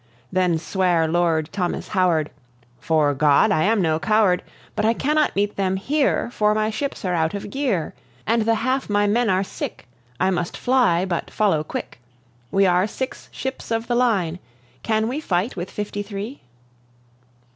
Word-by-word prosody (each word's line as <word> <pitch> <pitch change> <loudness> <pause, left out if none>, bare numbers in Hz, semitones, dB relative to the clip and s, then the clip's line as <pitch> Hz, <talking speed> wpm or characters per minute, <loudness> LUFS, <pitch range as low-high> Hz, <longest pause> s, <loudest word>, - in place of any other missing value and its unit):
Then 180 -3 +2
sware 170 -1 +1
Lord 160 -2 +1
Thomas 185 -3 -2
Howard: 175 -6 +1 0.5
"'Fore 155 -3 +2
God, 140 0 +4
I 155 - +2
am 215 -2 +2
no 160 -1 +1
coward; 210 -2 +3 0.3
But - - -1
I 225 +2 +3
cannot 300 +4 +1
meet 205 +1 0
them 190 -1 +1
here, 270 +4 0
for 210 -2 +2
my 215 0 +1
ships 270 0 -4
are 180 - 0
out 160 +1 0
of 200 0 -6
gear, 255 - -1 0.3
And 230 +1 +2
the 225 +1 +2
half 255 +4 -1
my 205 0 +2
men 225 +3 +2
are 190 +1 +2
sick. 190 - -6 0.3
I 190 +1 +2
must 175 -2 -2
fly, 240 -9 +2
but 175 -3 -3
follow 190 -8 +1
quick. 155 - -6 0.5
We 195 0 +3
are 180 +1 +3
six 260 +4 -6
ships 265 0 -5
of 225 0 -1
the 240 - -1
line; 200 -9 +1 0.4
can 220 0 0
we 260 +5 -2
fight 195 - -1
with 180 0 -5
fifty 205 0 -4
three?" 205 +6 -6
200 Hz, 170 wpm, -22 LUFS, 175-225 Hz, 0.5 s, God